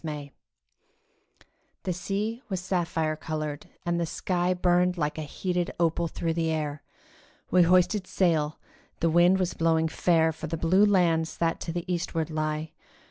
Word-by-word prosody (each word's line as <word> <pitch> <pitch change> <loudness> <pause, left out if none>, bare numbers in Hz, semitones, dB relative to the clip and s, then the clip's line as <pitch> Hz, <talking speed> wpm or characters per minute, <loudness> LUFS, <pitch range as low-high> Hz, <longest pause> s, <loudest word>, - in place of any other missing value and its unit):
GREECE 150 -3 -5 1.5
THE 185 - -1
sea 205 +6 -3
was 190 -2 -1
sapphire 165 -4 -1
coloured, 155 -1 -5 0.2
and 170 0 0
the 170 - -1
sky 180 +1 -1
Burned 180 0 +2
like 150 -1 -1
a 150 -2 -6
heated 180 0 -1
opal 170 0 +1
through 165 +1 -2
the 165 -1 0
air; 150 -2 -2 0.7
We 180 - +6
hoisted 185 +3 +3
sail; 155 -5 +1 0.4
the 165 0 +2
wind 175 +3 +5
was 185 -2 -1
blowing 160 -1 +2
fair 160 0 +2
For 160 - -7
the 165 - -3
blue 185 +6 +4
lands 170 -5 +2
that 165 -1 0
to 165 - -4
the 175 0 -4
eastward 165 -2 -2
lie. 155 0 -2
170 Hz, 155 wpm, -27 LUFS, 160-180 Hz, 1.5 s, We